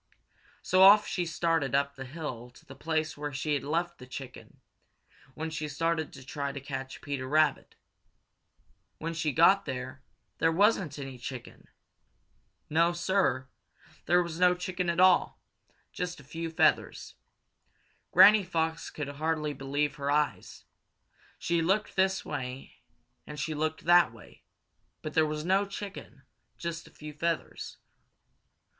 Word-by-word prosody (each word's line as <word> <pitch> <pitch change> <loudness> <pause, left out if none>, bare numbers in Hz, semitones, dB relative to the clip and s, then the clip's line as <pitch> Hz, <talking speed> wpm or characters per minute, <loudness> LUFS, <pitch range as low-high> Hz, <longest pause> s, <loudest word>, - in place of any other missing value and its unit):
So 185 - +3
off 205 +2 +8
she 175 -2 -2
started 160 -5 0
up 140 0 +1
the 135 -1 -7
hill 130 -4 -6
to - - -18
the 135 - -11
place 155 +2 -2
where 145 0 -5
she 145 +3 -2
had 145 - -1
left 170 +4 -2
the 125 - -11
chicken 130 0 -10 0.8
when 160 +1 -4
she 150 -1 -3
started 160 +1 -1
to 130 - -12
try 140 0 -3
to 140 - -6
catch 135 -1 -6
Peter 140 -3 -4
Rabbit. 150 0 +1 1.2
When 165 +1 -4
she 160 -2 -1
got 190 +7 +5
there, 130 -1 -6 0.4
there 165 0 +3
wasn't 190 -4 +2
any 135 -3 -7
chicken. 125 0 -8 1.0
No, 165 +3 +3
Sir, 170 -7 0 0.6
there 175 +2 +4
was 170 -1 -6
no 180 0 +5
chicken 180 0 -3
at 170 0 -1
all 185 -1 +4 0.5
just 180 -2 -4
a - - -13
few 165 +4 -5
feathers. 160 - +1 1.0
Granny 200 +3 +8
Fox 165 -2 -2
could 150 -2 -5
hardly 150 +1 -2
believe 145 +2 -2
her 140 0 -3
own 145 - +4
eyes. 150 -1 -3 0.7
She 170 -1 0
looked 195 +6 0
this 190 0 +1
way 130 -2 -6 0.5
and 150 0 -7
she 155 +2 -2
looked 155 +1 -2
that 175 -5 +6
way, 115 -3 -16 0.6
but 155 - -5
there 160 -1 +3
was 150 +1 -4
no 195 +2 +2
chicken, 200 0 -8 0.3
just 170 -1 -5
a - - -17
few 150 0 -10
feathers. 165 +2 -3
155 Hz, 150 wpm, -29 LUFS, 140-175 Hz, 1.2 s, off